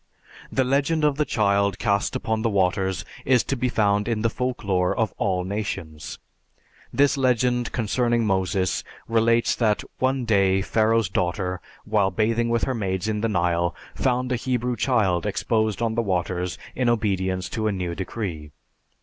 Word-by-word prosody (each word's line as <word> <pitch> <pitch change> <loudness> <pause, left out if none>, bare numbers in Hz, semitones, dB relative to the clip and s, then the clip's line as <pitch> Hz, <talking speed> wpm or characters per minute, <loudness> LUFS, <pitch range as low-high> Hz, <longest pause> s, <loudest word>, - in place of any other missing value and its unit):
The 130 - +2
legend 140 +5 +1
of 145 -2 +2
the 150 - +2
child 100 -4 +1
cast 100 -2 0
upon 110 0 -1
the 115 - +1
waters 95 -1 0 0.2
is 125 -4 +3
to 135 - -2
be 125 0 0
found 105 -2 +1
in 115 -2 -1
the 115 - +2
folklore 100 -9 -1
of 110 -3 0
all 95 -3 0
nations. 90 -6 -5 0.7
This 140 0 +3
legend, 125 -2 +1
concerning 120 +1 +1
Moses, 95 -1 0 0.2
relates 115 +1 +3
that 110 -3 +1 0.2
one 130 -1 +1
day 95 -3 +3
Pharaoh's 110 0 +2
daughter, 90 0 -2 0.2
while 105 -3 +2
bathing 115 +4 +1
with 115 -1 +1
her 130 - 0
maids 95 -3 -2
in 105 -1 -1
the 115 - 0
Nile, 85 -2 +1 0.2
found 125 -1 0
a 125 - +1
Hebrew 125 0 -1
child 105 -10 +1
exposed 110 -1 0
on 115 -1 0
the 115 - +1
waters 90 -3 -2 0.2
in 125 -2 +1
obedience 95 -5 0
to 110 -1 -2
a - - +1
new 90 -3 -3
decree. 90 -5 -5
110 Hz, 160 wpm, -24 LUFS, 95-120 Hz, 0.7 s, is